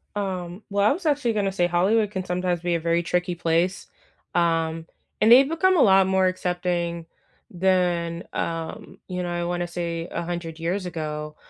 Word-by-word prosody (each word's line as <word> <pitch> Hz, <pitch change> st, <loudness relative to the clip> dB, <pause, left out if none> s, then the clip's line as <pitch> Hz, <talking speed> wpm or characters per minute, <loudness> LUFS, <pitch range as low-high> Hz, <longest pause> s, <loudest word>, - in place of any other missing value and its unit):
Um, 185 Hz, -1 st, -4 dB
well, 200 Hz, 0 st, +2 dB
I -, -, +4 dB
was 350 Hz, +4 st, -8 dB
actually 285 Hz, -6 st, +1 dB
gonna 200 Hz, -2 st, 0 dB
say 180 Hz, -2 st, +1 dB
Hollywood 200 Hz, +5 st, +2 dB
can 190 Hz, -2 st, -4 dB
sometimes 180 Hz, -1 st, -1 dB
be 175 Hz, -1 st, 0 dB
a -, -, 0 dB
very 170 Hz, +1 st, +1 dB
tricky 180 Hz, +1 st, -1 dB
place, 170 Hz, +3 st, 0 dB, 0.5 s
um, 165 Hz, -1 st, +1 dB, 0.4 s
and 220 Hz, -, +5 dB
they've 265 Hz, +3 st, +8 dB
become 365 Hz, +4 st, +2 dB
a -, -, +5 dB
lot 195 Hz, -2 st, +5 dB
more 190 Hz, 0 st, +3 dB
accepting 175 Hz, -2 st, -2 dB, 0.4 s
than, 175 Hz, -2 st, 0 dB
um, 165 Hz, -1 st, -4 dB
you 180 Hz, -1 st, -3 dB
know, 175 Hz, -, -3 dB
I 175 Hz, 0 st, -2 dB
wanna 175 Hz, 0 st, -2 dB
say 170 Hz, -1 st, -4 dB
100 170 Hz, -1 st, -4 dB
years 180 Hz, +4 st, -2 dB
ago, 150 Hz, -3 st, -5 dB
175 Hz, 170 wpm, -24 LUFS, 170-190 Hz, 0.5 s, they've